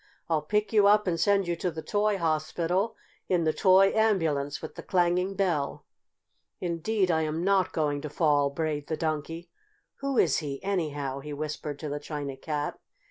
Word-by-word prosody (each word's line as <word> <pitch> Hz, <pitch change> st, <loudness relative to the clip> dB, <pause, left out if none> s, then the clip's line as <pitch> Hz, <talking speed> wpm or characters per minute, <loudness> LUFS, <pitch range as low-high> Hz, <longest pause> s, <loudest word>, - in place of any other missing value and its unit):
I'll 160 Hz, -2 st, +1 dB
pick 210 Hz, +8 st, -1 dB
you 205 Hz, -2 st, +6 dB
up 210 Hz, +1 st, +5 dB
and 170 Hz, -3 st, 0 dB
send 200 Hz, 0 st, +3 dB
you 170 Hz, -, 0 dB
to 180 Hz, -, -1 dB
the 160 Hz, -1 st, -6 dB
toy 210 Hz, 0 st, +1 dB
hospital 170 Hz, +5 st, 0 dB, 0.3 s
in 180 Hz, -2 st, +2 dB
the 155 Hz, -1 st, +2 dB
toy 190 Hz, +4 st, +5 dB
ambulance 160 Hz, -10 st, +1 dB
with -, -, -8 dB
the -, -, -8 dB
clanging 180 Hz, +1 st, +1 dB
bell." 170 Hz, -8 st, -1 dB, 0.7 s
"Indeed 180 Hz, +3 st, 0 dB
I 160 Hz, -1 st, +2 dB
am 155 Hz, +2 st, -2 dB
not 195 Hz, -1 st, +2 dB
going 145 Hz, -3 st, -1 dB
to 150 Hz, -, -5 dB
fall!" 145 Hz, -2 st, +2 dB
brayed 150 Hz, 0 st, -3 dB
the 160 Hz, -, -2 dB
Donkey. 160 Hz, +1 st, -3 dB, 0.5 s
"Who 275 Hz, -2 st, -2 dB
is 160 Hz, -10 st, +4 dB
he, 140 Hz, -3 st, -5 dB
anyhow?" 145 Hz, -8 st, -2 dB
he 150 Hz, +2 st, -7 dB
whispered 150 Hz, 0 st, -4 dB
to 150 Hz, 0 st, -5 dB
the 145 Hz, +1 st, -3 dB
China 145 Hz, -2 st, -5 dB
Cat. 150 Hz, +1 st, -4 dB
165 Hz, 180 wpm, -28 LUFS, 150-190 Hz, 0.7 s, you